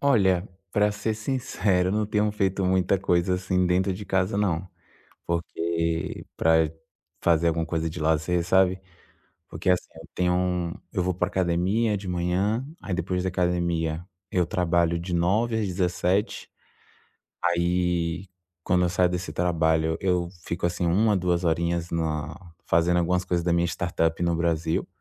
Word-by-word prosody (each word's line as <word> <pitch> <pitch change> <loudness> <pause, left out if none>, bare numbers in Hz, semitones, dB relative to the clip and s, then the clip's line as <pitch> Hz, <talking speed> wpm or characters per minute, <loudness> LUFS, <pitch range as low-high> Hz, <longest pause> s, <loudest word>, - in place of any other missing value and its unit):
Olha, 100 -9 +3 0.2
pra 105 +1 +2
ser 105 +1 -2
sincero, 105 -6 0
não 105 0 0
tenho 105 0 +1
feito 95 -2 0
muita 95 +1 +2
coisa, 90 0 +1
assim, 90 0 0
dentro 95 +2 +2
de 100 +3 -7
casa, 95 +1 0
não. 95 -4 0 0.6
Porque 85 -1 -2
pra 80 -1 +3 0.5
fazer 85 0 +3
alguma 80 0 0
coisa 80 -1 -1
de 80 +1 -7
lazer, 80 +2 +1
sabe. 95 +1 +3 0.7
Porque, - - -4
assim, 90 - +1
eu 80 +1 -12
tenho 90 0 +1
um 90 -2 0 0.2
eu 90 - 0
vou 90 +1 0
pra 90 +1 0
academia 95 +5 +1
de 95 -1 -7
manhã, 90 +7 0 0.2
aí 95 - -3
depois 90 +1 -1
da - - +1
academia 85 -2 0 0.3
eu 90 -1 +2
trabalho 85 -1 +1
de 85 +1 -4
09:00 105 +7 +1
às 110 - 0
17:00. 90 +2 0 0.9
Aí, 85 0 0 0.3
quando 90 +1 +2
eu - - +2
saio 90 +1 +2
desse 90 -2 -4
trabalho, 80 -1 +1
eu 90 -2 +1 0.2
fico, 85 0 -2
assim, 85 0 -1
1, 105 +5 +3
2 90 -1 0
horinhas 85 +1 0
na 80 -1 -2 0.3
fazendo 85 +1 +3
algumas 90 +1 +1
coisas 90 -2 -1
da 85 - +2
minha 85 0 +2
startup 85 0 -1
no 85 -1 +2
Brasil, 80 -1 0
90 Hz, 155 wpm, -25 LUFS, 85-95 Hz, 0.9 s, Olha